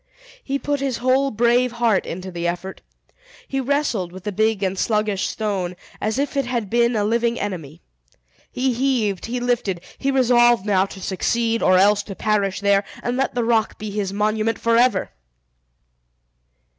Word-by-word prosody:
He 275 0 -1
put 285 0 -2
his 270 -3 -1
whole 260 +3 +2
brave 240 +1 +2
heart 235 -4 +1
into 185 +2 -6
the 170 -1 -3
effort. 175 +2 -4 0.7
He 270 - -2
wrestled 255 -9 -1
with 185 0 -11
the 210 - -3
big 215 0 +1
and 190 0 0
sluggish 210 -1 0
stone, 195 -5 -2 0.3
as 215 +2 -1
if 285 +1 -1
it 275 -3 0
had 235 -5 -2
been 235 0 +3
a 210 - +1
living 235 +2 0
enemy. 170 -6 -5 0.7
He 255 0 0
heaved, 230 -7 0
he 245 +2 -2
lifted, 240 -7 -1 0.2
he 275 - 0
resolved 240 -5 +4
now 195 -2 +2
to 195 - -10
succeed, 230 +5 0
or 185 - +4
else 205 +2 +4
to 200 -1 -9
perish 205 -2 0
there, 200 0 +3 0.2
and 245 - -1
let 265 0 -1
the 240 - +1
rock 225 -1 +1
be 215 0 -6
his 200 -2 -2
monument 215 +2 0
forever! 230 -3 +2
220 Hz, 170 wpm, -21 LUFS, 195-245 Hz, 0.7 s, resolved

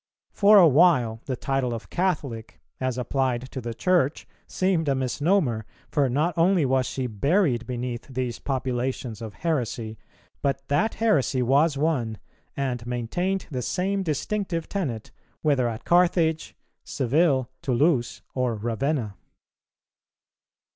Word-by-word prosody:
For 205 +1 +6
a 180 -4 +8
while 130 -7 +4
the 130 - -2
title 130 -1 -1
of 115 - -9
Catholic 145 -11 -2 0.2
as 130 -1 -1
applied 130 0 -1
to 130 - -5
the 115 -1 -5
Church 170 -2 +1 0.2
seemed 180 -5 0
a 135 - +2
misnomer; 135 - +1 0.3
for 145 -3 +2
not 150 +8 0
only 170 -1 +3
was 130 -1 +1
she 130 - -3
buried 125 - +1
beneath 125 -1 -4
these 125 -3 -3
populations 130 -3 -3
of 110 -2 -7
heresy, 120 - -2 0.4
but 135 -1 -1
that 210 +11 +1
heresy 145 - +2
was 140 +4 +3
one, 135 -8 0 0.4
and 130 -4 -2
maintained 175 +11 -2
the 130 -3 -2
same 195 +8 -1
distinctive 170 +1 -2
tenet, 135 - -4 0.3
whether 135 -6 +2
at 110 -1 -7
Carthage, 170 -2 +2 0.3
Seville, 135 -1 +1
Toulouse, 135 -2 +1
or 125 -3 0
Ravenna. 120 +1 -2
135 Hz, 125 wpm, -25 LUFS, 120-165 Hz, 0.4 s, a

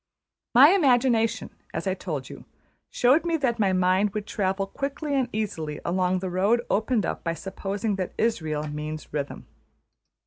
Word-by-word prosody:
My 270 +5 +9
imagination, 245 - +2 0.2
as - - -3
I 190 - +1
told 155 -8 -5
you, - - -11 0.4
showed 260 +6 +3
me 335 -1 0
that 245 -6 0
my 200 -3 +3
mind 185 +2 +2
would 210 -1 -2
travel 195 -1 -1
quickly 280 +7 -4
and 260 -3 +1
easily 160 -8 -3
along 180 +1 +1
the 185 0 -3
road 205 +7 +2
opened 220 -1 +1
up - - -4
by 165 -1 -1
supposing 195 +3 -3
that 185 -2 -4
Israël 155 -9 -1
means 150 0 -6
Rhythm. 145 -2 -4
200 Hz, 160 wpm, -25 LUFS, 180-240 Hz, 0.4 s, My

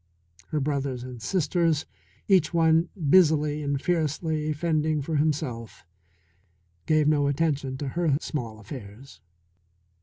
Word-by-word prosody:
Her 155 - -1
brothers 135 -3 -2
and 125 -2 -9
sisters, 165 - +1 0.4
each 180 -5 +3
one 165 0 +3 0.2
busily 150 -4 +4
and 140 -1 -1
fiercely 155 -1 -1
fending 155 -1 0
for 155 +1 -1
himself, 140 - -2 1.0
gave 155 -1 +3
no 145 -2 +3
attention 140 -2 -1
to 140 0 -4
her 165 -2 +1
small 115 -10 -5
affairs. 105 - -11
150 Hz, 115 wpm, -26 LUFS, 135-160 Hz, 1.0 s, busily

